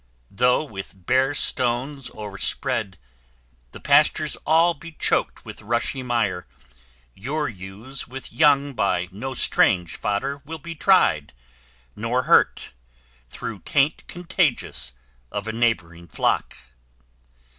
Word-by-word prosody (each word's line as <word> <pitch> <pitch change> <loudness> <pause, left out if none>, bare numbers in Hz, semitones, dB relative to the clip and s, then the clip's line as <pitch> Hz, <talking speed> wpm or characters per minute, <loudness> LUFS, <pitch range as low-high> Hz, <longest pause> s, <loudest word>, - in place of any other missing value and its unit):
Though, 125 +7 +2
with 95 - -10
bare 135 +5 +2
stones 125 +1 +1
o'erspread, 100 -1 -1 0.7
the - - -10
pastures - - +3
all 165 +2 +4
Be 165 +2 -12
choked - - 0
with - - -10
rushy 120 +4 -1
mire, 115 - -1 0.7
your 145 - -3
ewes 105 +6 -5
with 135 +1 -9
young 145 -2 +3
By 95 -5 0
no 130 +7 -6
strange 90 -7 +3
fodder 135 +8 -2
will 160 +3 -7
be 165 +2 -8
tried, 150 - +3 0.6
nor 120 +4 -1
hurt - - +3 0.6
Through 105 - -6
taint 140 +7 0
contagious 175 - -1 0.4
of 100 +1 -4
a 110 - -3
neighbouring 90 -8 -1
flock. - - -1
125 Hz, 115 wpm, -23 LUFS, 100-140 Hz, 0.7 s, all